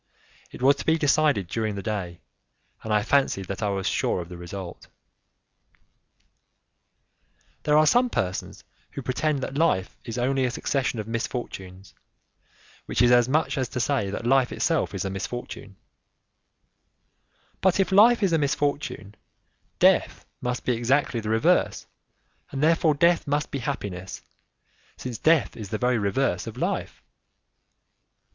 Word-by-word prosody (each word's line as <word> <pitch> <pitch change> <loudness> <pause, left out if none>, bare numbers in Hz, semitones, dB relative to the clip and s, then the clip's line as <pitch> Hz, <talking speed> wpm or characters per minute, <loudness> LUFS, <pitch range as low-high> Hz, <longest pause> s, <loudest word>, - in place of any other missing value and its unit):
It - - -9
was 140 +2 +5
to - - -7
be 160 0 +4
decided 145 - +2
during 110 +2 -2
the 100 - -5
day, 95 -6 -4 0.6
and 110 - -5
I 105 -1 +3
fancied 135 -9 +1
that 100 +3 -6
I 105 - 0
was 95 -1 -2
sure - - 0
of 85 -1 -7
the 90 - -8
result. 90 +1 -8 2.7
There 150 0 +3
are 155 - +5
some 245 +8 +4
persons 90 - -3 0.3
who 140 - -6
pretend 140 +2 -1
that 140 - -3
life 95 - +1
is 115 0 -6
only 130 +2 +1
a 125 - +1
succession 130 0 -1
of 110 -1 -4
misfortunes, 100 -5 -5 0.9
which - - -2
is 120 0 +5
as 120 0 +5
much 155 0 +1
as 130 -3 -1
to 125 - -4
say 130 -5 0
that 110 +4 -5
life 130 0 +3
itself - - 0
is - - -3
a 95 - -2
misfortune; 100 0 -6 1.9
but 190 +1 +3
if 195 - +1
life 220 +3 +6
is 185 -4 +2
a 165 - +3
misfortune, 145 -7 -2 0.6
death - - +3 0.2
must 125 0 -3
be 125 - +2
exactly 120 +1 +1
the 110 -1 -5
reverse 110 +1 +2 0.6
and 135 +1 -3
therefore 160 -1 +3
death 170 +2 +3
must 145 +1 -1
be 140 - -3
happiness, 100 -9 -5 0.7
since 125 -4 -6
death 160 -2 +3
is 105 -4 -8
the 110 - -2
very 125 +1 +1
reverse 100 -1 0
of - - -7
life. - - -3
125 Hz, 150 wpm, -25 LUFS, 100-145 Hz, 2.7 s, life